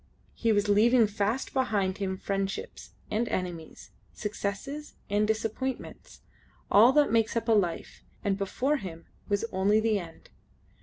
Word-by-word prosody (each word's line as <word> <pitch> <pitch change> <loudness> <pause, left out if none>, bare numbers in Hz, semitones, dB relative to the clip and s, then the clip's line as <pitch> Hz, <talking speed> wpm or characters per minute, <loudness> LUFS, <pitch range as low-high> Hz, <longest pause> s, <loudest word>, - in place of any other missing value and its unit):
He 230 - +1
was 205 -1 +2
leaving 225 +4 +5
fast 210 +4 -2
behind 210 -8 0
him 190 -1 -2
friendships, 195 0 -4 0.2
and 230 +2 0
enmities, 175 -3 -5 0.2
successes, 210 +8 -5 0.2
and 210 +1 +2
disappointments 225 +4 -4 0.5
all 220 +5 +7
that 295 0 +4
makes 225 0 +2
up 230 - -2
a - - +3
life; 185 -6 0 0.2
and 200 -2 +1
before 250 +9 0
him 170 -7 -8 0.2
was 205 +2 +1
only 195 +3 +3
the 220 -2 +1
end. 165 -3 -12
210 Hz, 140 wpm, -28 LUFS, 195-230 Hz, 0.5 s, all